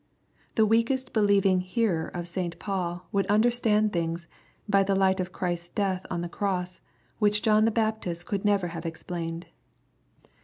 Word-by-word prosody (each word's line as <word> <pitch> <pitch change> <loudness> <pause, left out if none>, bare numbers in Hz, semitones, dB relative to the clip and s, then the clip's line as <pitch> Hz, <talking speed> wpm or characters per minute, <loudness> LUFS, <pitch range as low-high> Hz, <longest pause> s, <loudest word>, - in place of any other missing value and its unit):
The 220 - +5
weakest 230 +4 +1
believing 200 -3 +4
hearer 185 -3 0
of 175 -1 -6
St. 175 -1 -3
Paul 180 -2 -3
would 200 -1 0
under 215 +4 +4
stand 215 -3 +2
things, 170 0 -2 0.4
by 200 -1 +4
the 195 0 +1
light 190 0 +3
of 185 0 -2
Christ's 175 -2 -3
death 190 -2 -1
on 175 -2 -2
the 175 - -3
cross, 185 -1 -2 0.4
which 210 -1 +3
John 215 0 +4
the - - +4
Baptist 215 -6 -1
could 200 -2 -2
never 200 -4 +2
have 165 -1 -6
explained. 165 +1 -5
190 Hz, 160 wpm, -27 LUFS, 175-210 Hz, 0.4 s, The